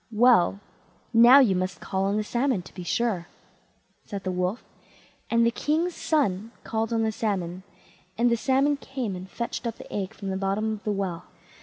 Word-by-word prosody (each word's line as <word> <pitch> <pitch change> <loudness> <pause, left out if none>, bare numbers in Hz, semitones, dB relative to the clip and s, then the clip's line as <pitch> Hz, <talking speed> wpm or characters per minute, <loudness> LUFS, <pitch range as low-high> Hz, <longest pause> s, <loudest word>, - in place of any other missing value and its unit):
"Well, 215 -5 +4 0.5
now 235 +3 +8
you 225 -8 +4
must 185 +1 -2
call 190 0 -2
on 200 +2 +1
the 215 - 0
salmon 240 -3 0
to - - -14
be 185 - -8
sure", 190 -3 -1 0.8
said 200 -1 -6
the 185 - -2
Wolf; 180 +4 -2 0.7
and 230 0 +3
the 235 - +3
king's 320 +8 0
son 225 - 0
called 225 0 -2
on 225 -1 +1
the 220 - +1
salmon, 190 -5 -2 0.6
and 240 +1 +3
the - - +4
salmon 270 +4 +2
came 260 -8 -4
and 185 +1 -8
fetched 235 +2 -4
up 230 - -3
the - - -12
egg 200 +1 -3
from 200 -3 -6
the 190 - -2
bottom 200 +3 -1
of 215 - -8
the 210 - +1
well. 190 -4 -3
215 Hz, 190 wpm, -26 LUFS, 190-235 Hz, 0.8 s, now